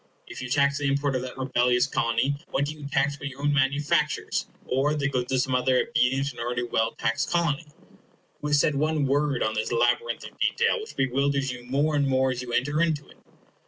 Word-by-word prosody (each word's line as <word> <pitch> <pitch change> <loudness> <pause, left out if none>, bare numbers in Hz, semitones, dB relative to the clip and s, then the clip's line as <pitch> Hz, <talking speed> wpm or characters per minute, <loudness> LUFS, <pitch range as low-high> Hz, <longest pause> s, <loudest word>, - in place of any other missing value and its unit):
If - - -9
you 130 - -5
tax 140 +1 +2
the 145 - 0
import 140 0 0
of 130 - 0
that 130 +1 -7
rebellious 125 -1 +2
Colony, 115 +1 0
what 140 - 0
do 150 - -4
you 150 -2 -8
tax 140 0 0
but 135 - -5
your 140 +1 -8
own 145 0 +2
manufactures, 145 +1 +1 0.2
or 140 +4 +1
the 140 -2 0
goods 125 -2 -2
of 130 -1 +3
some 130 0 -1
other 125 0 +3
obedient 135 +3 +1
and 120 - -13
already 120 +1 -2
well 115 -1 0
taxed 115 - 0
Colony? 165 -3 0 0.7
Who 150 - -3
has 145 0 +3
said 150 - +3
one 150 +1 +1
word 140 -1 +1
on 110 - 0
this 110 +2 -2
labyrinth 460 - +1
of - - -18
detail, 470 0 +2
which 440 - -10
bewilders 135 +1 0
you 120 0 -9
more 145 +4 +1
and 140 -1 +2
more 130 0 +2
as 125 -1 -3
you 125 -1 -7
enter 145 +6 +1
into 155 -4 0
it? - - -18
140 Hz, 220 wpm, -26 LUFS, 125-145 Hz, 0.7 s, of